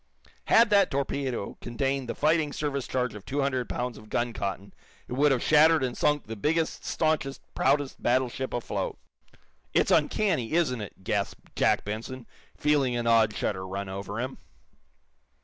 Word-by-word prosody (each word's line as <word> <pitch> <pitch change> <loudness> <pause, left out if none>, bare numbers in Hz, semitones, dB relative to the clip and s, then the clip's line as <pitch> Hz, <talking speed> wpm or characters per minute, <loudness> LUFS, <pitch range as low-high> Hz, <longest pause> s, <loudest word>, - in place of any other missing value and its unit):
Had 230 -1 +5
that 200 -1 +5
torpedo 135 -5 -2
contained 135 +1 -2
the - - -2
fighting 155 0 +2
service 140 -3 -2
charge 125 -1 -1
of 105 -2 -9
two 140 +2 -2
hundred 130 -3 -1
pounds 125 -1 -3
of 110 - -15
gun 120 +1 -1
cotton 100 -1 -4 0.3
it - - -6
would 145 +3 +4
have 130 -3 +1
shattered 155 0 +5
and 125 -2 -1
sunk 145 -1 +1
the 115 - -6
biggest, 160 +8 0
staunchest, 155 -4 0
proudest 140 0 +1
battleship 130 +1 0
afloat. 120 - -3 0.8
"It's - - +3
uncanny 165 - +2
isn't 150 -9 +1
it?" 100 -2 -9
gasped 100 +1 -3
Jack - - +2
Benson, 115 +4 -5 0.3
feeling 145 -4 +2
an 120 0 -1
odd 115 -2 +4
shudder 95 -2 -2
run 100 +1 -4
over 100 +3 -5
him. 130 +2 -4
130 Hz, 160 wpm, -27 LUFS, 115-145 Hz, 0.8 s, Had